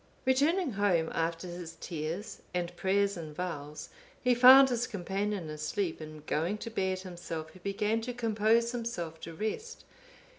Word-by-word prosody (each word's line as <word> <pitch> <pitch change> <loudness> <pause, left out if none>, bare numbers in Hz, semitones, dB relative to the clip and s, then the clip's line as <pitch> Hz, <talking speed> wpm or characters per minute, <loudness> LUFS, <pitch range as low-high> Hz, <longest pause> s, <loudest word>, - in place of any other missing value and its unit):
Returning 290 +5 +3
home, 195 -6 +1
after 165 +2 -1
his 175 -2 -7
tears 165 +4 -5
and 175 0 -2
prayers 200 +2 +1
and 155 -3 -7
vows, 150 -4 -5 0.3
he 250 0 +3
found 260 +2 +9
his 245 -1 0
companion 200 -2 -2
asleep; 160 +3 -2
and 155 -1 -9
going 170 +8 0
to 230 - -6
bed 190 -3 -1
himself, 170 -4 -6
he 185 - -15
began 210 +4 0
to 250 +2 -4
compose 230 0 +2
himself 225 -10 -4
to 165 - -7
rest. 440 - -4
190 Hz, 150 wpm, -31 LUFS, 165-230 Hz, 0.3 s, found